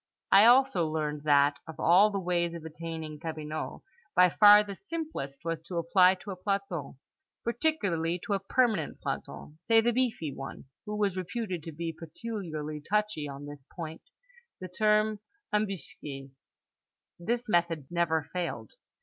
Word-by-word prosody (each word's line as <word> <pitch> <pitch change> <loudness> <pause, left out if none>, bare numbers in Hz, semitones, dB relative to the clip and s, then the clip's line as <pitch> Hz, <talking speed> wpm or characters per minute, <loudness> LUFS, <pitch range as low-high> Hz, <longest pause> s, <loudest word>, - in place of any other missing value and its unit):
I 200 +2 +8
also 245 -8 +5
learned 150 -1 -3
that, 145 -1 +4
of 160 0 -9
all 190 +5 +6
the 200 - -3
ways 175 -2 0
of 165 -1 -8
attaining 160 -1 -6
cabinot, 155 -1 -5 0.3
by 180 -1 +6
far 210 +2 +8
the 200 -1 -7
simplest 310 - -6
was 165 -1 -2
to 175 - -4
apply 180 +2 +5
to 200 - -6
a - - -5
planton, 185 -6 -3 0.5
particularly 200 - 0
to 205 - -1
a 195 - +1
permanent 210 - 0
planton, 155 +1 -6
say 225 -1 +6
the 235 +1 +2
beefy 230 - -1
one 135 +1 -8 0.2
(who 210 - -3
was 200 -3 +1
reputed 185 -1 -3
to 165 - -7
be 165 +1 -4
peculiarly 160 -4 -6
touchy 210 -3 -1
on 140 +1 -8
this 145 -1 -10
point) 160 -2 -6 0.6
the 185 - -7
term 215 +2 +2 0.3
embusqué. 150 -9 -3 0.9
This 235 +7 -2
method 170 -6 +1
never 165 -2 +1
failed. 170 - -3
175 Hz, 150 wpm, -29 LUFS, 155-210 Hz, 0.9 s, I